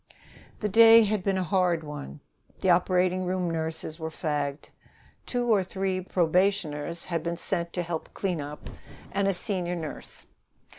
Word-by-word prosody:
The 210 - +1
day 225 +2 +8
had 210 -2 0
been 195 -1 +1
a 185 - 0
hard 180 -2 +1
one. 145 -1 -8 0.4
The 190 - +3
operating 180 +1 +2
room 180 -1 -1
nurses 160 0 -3
were 160 0 -3
fagged. 150 -3 -3 0.6
Two 245 -1 -1
or 200 -3 +3
three 190 0 -2
probationers 175 -3 0
had 170 -2 -2
been 170 +1 -3
sent 170 -1 -1
to 175 - -1
help 165 -2 -5
cleanup, 150 -6 -4 0.4
and 200 0 +1
a 195 - +2
senior 180 -3 -2
nurse. 160 -3 -7
180 Hz, 150 wpm, -27 LUFS, 160-190 Hz, 0.6 s, day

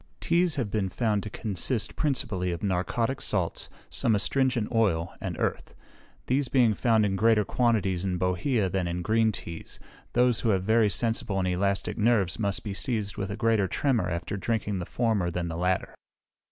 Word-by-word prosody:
Teas 170 -1 +1
have 115 -8 -2
been 100 -3 0
found 105 0 0
to 105 - -6
consist 105 +3 0
principally 110 - 0
of 85 - -5
narcotic 105 +7 -1
salts, 90 -5 -2 0.2
some 115 - +1
astringent 125 +2 +1
oil, 100 -8 +1
and - - -4
earth. - - -3 0.5
These 135 +2 +1
being 120 -4 +3
found 110 0 +2
in 95 -1 0
greater 110 0 +3
quantities 100 -8 +1
in 95 -2 -1
bohea 95 +5 0
than 95 -1 -1
in 85 +1 -3
green 110 +2 +2
teas, 85 -5 -8 0.3
those 125 -1 +3
who 115 - 0
have 95 -3 +2
very 110 +1 +3
sensible 110 0 -1
and 95 -1 0
elastic 100 +4 -1
nerves 105 -4 +2
must 100 -2 -1
be 100 - -4
seized 105 -2 -2
with 100 -1 -3
a 100 - -4
greater 110 -3 +2
tremor 115 -3 0
after 85 +3 -3
drinking 105 -1 -2
the 90 - -5
former 110 -7 0
than 85 0 -3
the 80 - -4
latter. 90 +2 -1
105 Hz, 180 wpm, -27 LUFS, 95-115 Hz, 0.5 s, being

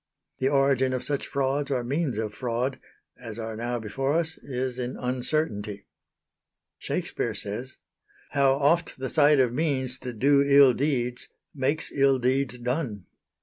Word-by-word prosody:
The 130 - +2
origin 135 -2 +2
of 130 - -2
such 145 -2 -2
frauds 140 +1 -1
or 130 -3 0
means 140 -1 -1
of 110 -1 -3
fraud 125 +3 -2 0.4
as 115 -3 -8
are 110 -1 -5
now 120 +2 -2
before 135 +5 -2
us 165 0 +1
is 130 -1 -4
in 125 +1 -4
uncertainty. 125 -5 -2 0.9
Shakespeare - - -3
says: 120 +6 -5 0.5
"How 140 -2 +4
oft 150 +5 +1
the 130 0 -4
sight 150 -2 +4
of 125 -2 +3
means 130 -3 0
to 125 - -5
do 140 +5 +3
ill 140 -2 +6
deeds 125 -3 -1 0.3
Makes 145 +3 +1
ill 135 -1 +3
deeds 130 0 0
done." 125 - -3
130 Hz, 145 wpm, -26 LUFS, 120-140 Hz, 0.9 s, ill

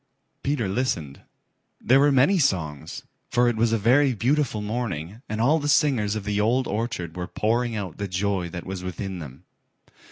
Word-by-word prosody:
Peter 140 -7 -1
listened. 95 - -2 0.6
There 130 +2 +4
were 145 +1 +5
many 140 +9 +4
songs, 80 - -1 0.3
for 120 0 +3
it 120 - +1
was 115 +1 +2
a 115 - +3
very 125 +5 +3
beautiful 130 0 +1
morning 105 -3 -4
and 110 - -3
all 145 +8 +3
the 145 - -3
singers 130 -10 +2
of 110 - -3
the 105 0 0
Old 125 +5 +2
Orchard 100 -6 -3
were 90 0 -4
pouring 115 +2 0
out 95 -6 -5
the 100 - -2
joy 95 -1 -1
that 85 +1 -7
was 95 -1 -5
within 95 0 -5
them. 70 0 -10
110 Hz, 180 wpm, -25 LUFS, 90-125 Hz, 0.6 s, were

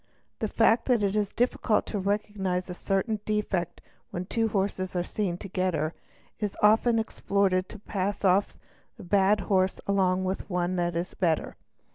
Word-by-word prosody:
The 220 - 0
fact 225 +2 +3
that 240 -5 +3
it 200 0 +1
is 210 -2 0
difficult 235 -2 +1
to 210 - -3
recognise 195 -2 -1
a - - -3
certain 195 +4 -1
defect 205 -5 -2 0.3
when 175 +1 -4
two 225 +4 0
horses 190 -3 -2
are 175 - +1
seen 180 -2 -2
together 180 -5 -1 0.5
is 210 -2 -3
often 225 +2 +5
exploited 195 -4 0
to - - -9
pass 200 -1 -3
off 190 +2 +3 0.4
a 220 - -10
bad 200 +2 +3
horse 190 -1 +1
along 190 -2 +2
with 190 +1 -3
one 180 0 0
which 175 -1 -1
is 170 +2 -3
better. 165 -4 0
195 Hz, 160 wpm, -27 LUFS, 185-210 Hz, 0.5 s, often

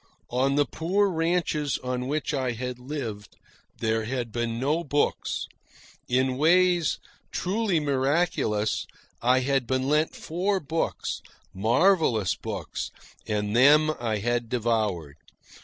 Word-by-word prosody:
On 135 +3 +2
the 145 0 +3
poor 190 +8 +1
ranches 165 -3 0
on 125 0 -2
which 150 +2 -1
I 130 -3 0
had 125 +1 -5
lived 120 -7 -6 0.4
there 110 -1 0
had 120 -1 -3
been 115 0 -2
no 150 +6 +1
books. 145 -1 0 0.6
In 130 +1 +1
ways 175 +2 +4 0.3
truly 195 -2 0
miraculous, 135 -6 0 0.3
I 125 +2 +4
had 135 -2 0
been 130 +1 0
lent 150 +2 +2
four 190 +4 -1
books, 160 +1 -2 0.3
marvellous 115 - +3
books, - - -5 0.4
and 105 0 -1
them 150 +5 +6
I 115 -3 -1
had 120 +2 -1
devoured. 105 - -1
130 Hz, 120 wpm, -26 LUFS, 115-155 Hz, 0.6 s, them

